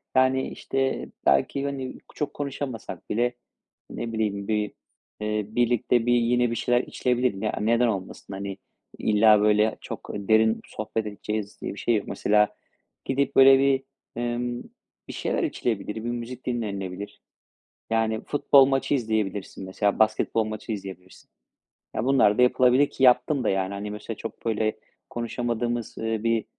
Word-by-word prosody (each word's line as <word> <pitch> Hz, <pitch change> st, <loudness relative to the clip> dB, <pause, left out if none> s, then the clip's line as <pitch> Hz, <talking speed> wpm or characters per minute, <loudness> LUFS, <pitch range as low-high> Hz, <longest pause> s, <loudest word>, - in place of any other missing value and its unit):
Yani, 130 Hz, 0 st, +3 dB
işte, 135 Hz, 0 st, -2 dB, 0.2 s
belki, 70 Hz, -, +2 dB
hani, 135 Hz, -2 st, -4 dB, 0.2 s
çok 150 Hz, -, -3 dB
konuşamasak 140 Hz, -4 st, -5 dB
bile, 120 Hz, +2 st, +1 dB, 0.6 s
ne 115 Hz, -1 st, -5 dB
bileyim, 100 Hz, -2 st, -1 dB
bir, 105 Hz, -1 st, 0 dB, 0.5 s
eee, 105 Hz, -1 st, -1 dB
birlikte 120 Hz, 0 st, +2 dB
bir 120 Hz, -, +3 dB
yine 120 Hz, 0 st, +2 dB
bir -, -, -1 dB
şeyler 120 Hz, +1 st, +2 dB
içilebilir 125 Hz, -2 st, 0 dB
mi? 100 Hz, +3 st, -5 dB
Ya, -, -, 0 dB
neden 115 Hz, +2 st, +3 dB
olmasın? 95 Hz, -1 st, -4 dB
Hani, 100 Hz, 0 st, -5 dB, 0.4 s
illa, 105 Hz, 0 st, +5 dB
böyle, 105 Hz, +1 st, +3 dB
çok -, -, -8 dB
derin 110 Hz, +2 st, +2 dB
sohbet 110 Hz, 0 st, -4 dB
edeceğiz 105 Hz, 0 st, -5 dB
diye -, -, -4 dB
bir -, -, -9 dB
şey 120 Hz, -, +2 dB
yok. 105 Hz, -, -2 dB
Mesela, 105 Hz, 0 st, +2 dB, 0.5 s
gidip, 140 Hz, +1 st, 0 dB
böyle, 135 Hz, 0 st, +8 dB
bir, 135 Hz, -1 st, +2 dB, 0.3 s
ımm, 120 Hz, 0 st, -2 dB, 0.4 s
bir -, -, -7 dB
şeyler -, -, -1 dB
içilebilir, 105 Hz, -3 st, -2 dB
bir 110 Hz, -, -5 dB
müzik 120 Hz, +1 st, -6 dB
dinlenilebilir. 100 Hz, -5 st, -4 dB, 0.7 s
Yani, 110 Hz, -1 st, 0 dB
futbol 140 Hz, -2 st, +5 dB
maçı 135 Hz, +1 st, 0 dB
izleyebilirsin, 110 Hz, -6 st, -2 dB
mesela. 100 Hz, +3 st, 0 dB
Basketbol 110 Hz, +1 st, +2 dB
maçı 110 Hz, +1 st, -6 dB
izleyebilirsin. 95 Hz, -3 st, -8 dB, 0.7 s
Ya, 115 Hz, -, -1 dB
bunlar 130 Hz, -6 st, +4 dB
da -, -, +4 dB
yapılabilir 125 Hz, +2 st, +4 dB
ki 135 Hz, -, -4 dB
yaptım 130 Hz, +2 st, +4 dB
da, -, -, +1 dB
yani. 95 Hz, 0 st, 0 dB
Hani, 105 Hz, +1 st, -5 dB
mesela 105 Hz, +1 st, -6 dB
çok, 115 Hz, -, -8 dB
böyle, 110 Hz, -1 st, 0 dB, 0.3 s
konuşamadığımız, 120 Hz, 0 st, -3 dB
ııı, 110 Hz, -1 st, -2 dB
bir, 115 Hz, -1 st, +1 dB
115 Hz, 150 wpm, -25 LUFS, 105-125 Hz, 0.7 s, böyle